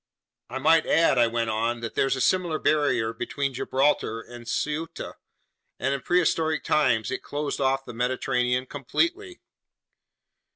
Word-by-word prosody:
"I 125 - -4
might 160 +4 +4
add," 150 -5 +4
I 120 - +5
went 115 -1 -1
on, 115 +2 -1
"that 115 - -5
there's 135 0 +1
a 130 - -3
similar 175 -2 +2
barrier 145 -9 +1
between 135 +4 -3
Gibraltar 130 -3 0
and 120 +1 -11
Ceuta, 150 +6 -3 0.6
and 135 +2 0
in 140 - -3
prehistoric 160 -2 +1
times 130 -7 +2
it 130 - -3
closed 145 -1 -4
off 135 0 +1
the - - -8
Mediterranean 125 +1 0
completely." 340 - -2
135 Hz, 140 wpm, -26 LUFS, 120-150 Hz, 0.6 s, I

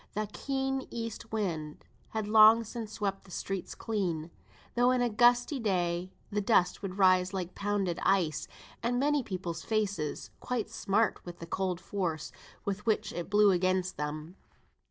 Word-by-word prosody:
The 215 0 -1
keen 270 -1 -2
east 230 -1 -6
wind 165 -9 -3 0.2
had 220 -2 -3
long 220 +1 +8
since 225 -1 -6
swept 195 -2 -2
the 195 - -18
streets 190 +1 -4
clean, 175 -7 -2 0.4
though 245 +1 +4
on 255 - +2
a 245 -1 +1
gusty 245 +5 +4
day 180 -4 0 0.2
the 210 0 0
dust 195 -4 +3
would 195 -1 -5
rise 185 -1 +4
like 185 -1 -3
pounded 200 -4 -1
ice, 175 -6 +1 0.3
and 245 +1 0
make 290 -1 +1
people's 175 -4 -4
faces 200 -8 -2
quite 235 -3 -3
smart 220 0 +1
with 175 -1 -8
the 170 - -8
cold 185 0 -2
force 170 -4 -3 0.3
with 200 +1 -2
which 215 0 +1
it 175 +1 -5
blew 205 0 +5
against 185 0 +1
them. 155 +4 -5
200 Hz, 155 wpm, -30 LUFS, 180-225 Hz, 0.4 s, long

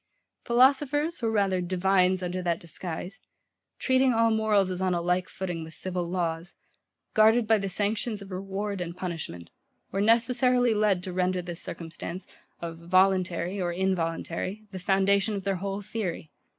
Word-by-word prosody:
Philosophers, 280 +6 +3
or 230 - +1
rather 195 -4 +1
divines 185 +1 +2
under 180 +1 -2
that 170 -2 0
disguise, 175 +4 -6 0.6
treating 260 -1 +3
all 230 0 +4
morals 215 -3 +2
as 180 0 -3
on 185 -1 +1
a - - 0
like 180 +1 0
footing 175 -3 -4
with 160 0 -8
civil 180 -2 -3
laws, 170 -1 -2 0.6
guarded 220 +2 +5
by 220 0 +4
the 195 0 -3
sanctions 210 +3 -1
of 200 -1 -11
reward 195 +1 -3
and 170 0 -5
punishment, 160 - -6 0.4
were 195 - -1
necessarily 245 +2 +3
led 210 -4 +2
to 185 - -5
render 185 0 +1
this 175 -1 -6
circumstance, 170 +2 -6 0.4
of 165 -1 -6
VOLUNTARY 185 +1 +2
or 175 -1 0
INVOLUNTARY, 185 +2 -2
the 190 - -6
foundation 195 +3 +2
of 195 - -4
their 195 -1 0
whole 195 +2 -4
theory. 190 -7 -4
190 Hz, 155 wpm, -27 LUFS, 175-215 Hz, 0.6 s, guarded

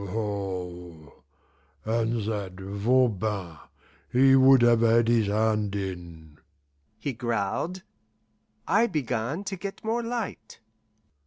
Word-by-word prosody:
"Aho! 90 -6 -5 0.6
And 115 0 0
that 100 -4 -3
Voban, 100 -4 0 0.5
he 135 +2 +5
would 130 -1 +6
have 120 -1 +5
had 115 0 +4
his 115 -3 +3
hand 105 -1 0
in," 85 -5 -7 0.6
he 130 +5 -4
growled. 120 - -2 0.8
I 225 +4 +3
began 135 - -2
to 195 -1 -4
get 195 +2 -7
more 230 +2 0
light. 230 - -5
110 Hz, 100 wpm, -26 LUFS, 100-130 Hz, 0.8 s, would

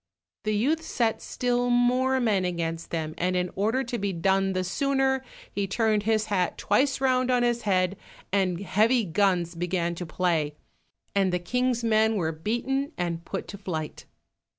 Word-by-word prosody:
The 215 0 +1
youth 290 +10 +1
set 235 -8 -1
still 245 0 0
more 250 +2 +3
men 215 -6 +2
against 165 -2 -3
them, 155 -2 -3
and 185 +1 +1
in 180 0 0
order 225 +7 +1
to 240 -1 -4
be 200 0 -1
done 190 +2 +1
the 185 0 0
sooner, 270 +5 +1 0.3
he 200 -1 -2
turned 215 +1 +1
his 215 0 +1
hat 195 -4 0
twice 270 +8 +2
round 255 -1 +2
on 250 -1 +3
his 240 -1 +1
head, 185 -2 +1 0.4
and 185 -3 +1
heavy 220 +4 +2
guns 180 -1 +1
began 175 0 -1
to 175 0 -6
play, 160 -3 0 0.6
and 195 -2 +2
the 180 - +1
king's 245 +6 0
men 220 0 +3
were 165 -5 0
beaten 240 - -2
and 170 -1 -3
put 195 - -4
to 200 - -8
flight. 160 -6 -5
200 Hz, 170 wpm, -26 LUFS, 180-245 Hz, 0.6 s, more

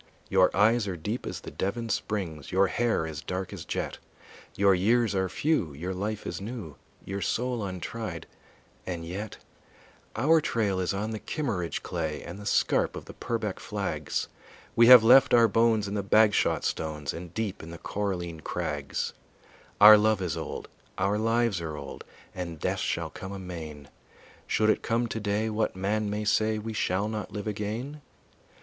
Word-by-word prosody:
Your 95 -1 +5
eyes 110 +1 +4
are 90 -3 -3
deep 105 +10 -4
as - - -5
the - - -8
Devon 115 +5 -2
springs, 90 -9 -3
Your 95 +1 +4
hair 115 -3 0
is 80 -2 -6
dark 95 0 -4
as - - -7
jet, - - -3 0.6
Your 100 0 +5
years 110 +5 +2
are 95 -1 0
few, 140 - 0
your 90 +6 -4
life 105 +3 -3
is - - -4
new, 100 - -6 0.3
Your 100 +1 -4
soul 120 +5 -1
untried, 95 -1 -5 0.6
and 85 -3 -4
yet 95 +5 -6 0.8
Our 155 +7 +4
trail 105 -8 0
is 90 - 0
on 105 +3 -2
the 110 - -4
Kimmeridge 100 - -3
clay 80 -4 -3
And 90 +4 -8
the 105 - -7
scarp - - +2
of - - -7
the - - -10
Purbeck - - -3
flags; - - -3 0.5
We 115 0 +6
have 125 -2 +11
left 125 +2 +7
our 115 -1 +6
bones 115 -1 +2
in 100 - -4
the 105 - 0
Bagshot 105 +2 +3
stones 75 -2 -2
And 85 0 -8
deep 110 -4 -3
in 80 - -9
the 85 - -8
Coralline 90 -3 -3
crags; - - -3 0.7
Our 105 +1 +10
love 110 -1 +3
is 85 -5 -2
old, - - -5 0.3
our 100 +2 +1
lives 115 -4 +1
are 80 -2 -5
old, 70 -2 -8 0.3
And 85 -3 -5
death - - -1
shall - - -2
come 95 - -8
amain; 80 -7 -7 0.6
Should 110 0 +3
it - - -1
come 115 +1 0
today, 110 -1 -1
what 110 -2 -1
man 105 +3 -1
may 105 +1 -2
say 110 0 +2
We 110 +1 -5
shall 100 -1 0
not 110 -2 -4
live 105 -1 -5
again? 110 +8 -4
100 Hz, 170 wpm, -28 LUFS, 90-110 Hz, 0.8 s, have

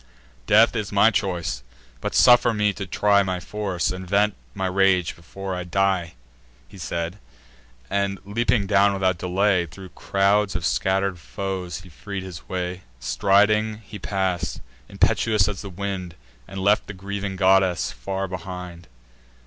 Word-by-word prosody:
Death 110 +3 +5
is 105 -3 -2
my 100 +2 +5
choice; 90 - -2 0.4
but - - -4
suffer 120 -1 +6
me 105 -1 +2
to 100 -2 -6
try 100 +3 +3
My 95 -2 -2
force, 95 -4 -2
and 90 0 -7
vent 105 +1 +3 0.2
my 95 - -2
rage 95 -1 +2
before 95 +3 -7
I 90 0 -3
die." 90 -2 0 0.5
He 95 - -14
said; 85 +3 -4 0.7
and, 100 0 -1
leaping 105 0 +1
down 100 +1 +4
without 95 -2 0
delay, 90 0 +1
Thro' 95 +5 -11
crowds 100 +1 +1
of 85 -2 -2
scatter'd 95 +1 0
foes 90 0 -5
he 90 - -14
freed 100 +3 -6
his 90 -4 -10
way. 90 0 -3 0.2
Striding 105 - +2
he 105 0 -9
pass'd, 90 - -2 0.3
impetuous 105 -4 +2
as 105 -2 -4
the 100 - -7
wind, 95 -2 -5 0.3
And 95 - -7
left 105 +3 +2
the 100 - -7
grieving 100 +1 -4
goddess 95 -2 +3
far 95 0 -4
behind. 90 -1 -7
95 Hz, 150 wpm, -23 LUFS, 90-100 Hz, 0.7 s, suffer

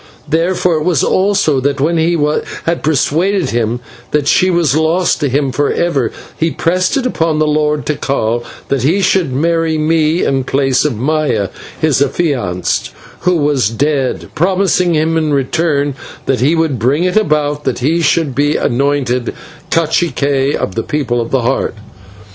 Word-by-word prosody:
Therefore 170 +1 +1
it 155 - -2
was 170 -4 +1
also 190 -7 +2
that 140 +1 -1
when 165 +5 +1
he 170 +2 +2 0.5
had 170 0 0
persuaded 160 +3 +1
him 120 +1 -1 0.3
that 150 -1 0
she 185 - +3
was 170 -6 +2
lost 160 +3 +1
to 145 -3 0
him 135 +1 0
forever, 145 -2 0 0.2
he 165 - 0
pressed 185 - 0
it 265 - -1
upon 165 -10 0
the 155 - +2
Lord 150 -1 0
Tikal 120 -5 -1 0.3
that 140 -2 0
he 165 +10 +2
should 185 -5 +2
marry 165 +3 0
me 155 +1 +1
in 135 -1 0
place 135 +1 +1
of 145 -6 0
Maya, 140 -6 0 0.3
his 150 -4 +2
affianced, 130 - -1 0.3
who 180 -1 +1
was 145 -8 +1
dead, 135 +2 -1
promising 180 0 +1
him 160 +1 +1
in 155 -2 +1
return 145 +1 0 0.3
that 135 - 0
he 145 +6 +3
would 160 -6 0
bring 135 +9 +1
it 180 0 0
about 150 -7 +1
that - - -1
he 155 +7 +1
should 155 -2 +1
be 145 +3 +1
anointed 125 -1 0 0.3
/cacique/ 145 -4 +1
of 95 - -3
the 115 - -1
People 125 -3 -1
of 115 - -4
the 135 - +1
Heart. 130 0 -1
150 Hz, 160 wpm, -14 LUFS, 135-165 Hz, 0.5 s, she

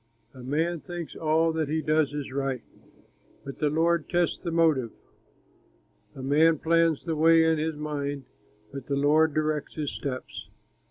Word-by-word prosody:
A 130 - -12
man 160 +6 -1
thinks 175 -1 -7
all 160 +1 +1
that 160 -3 -2
he 160 +1 0
does 155 -2 +2
is 145 -2 -5
right, 135 -2 -2 0.8
But 135 - -8
the 150 - +1
Lord 165 +1 +1
tests 175 -1 0
the 175 - -4
motive. 160 -7 +2 1.3
A 130 - -8
man 155 +4 +4
plans 165 0 +2
the 165 -2 -2
way 165 +1 +5
in 160 -1 +2
his 160 0 -2
mind, 145 -2 -4 0.5
But 135 -2 -7
the 140 - -1
Lord 150 +2 +3
directs 155 -1 -1
his 150 -3 -3
steps. 130 -2 -6
155 Hz, 160 wpm, -26 LUFS, 140-165 Hz, 1.3 s, way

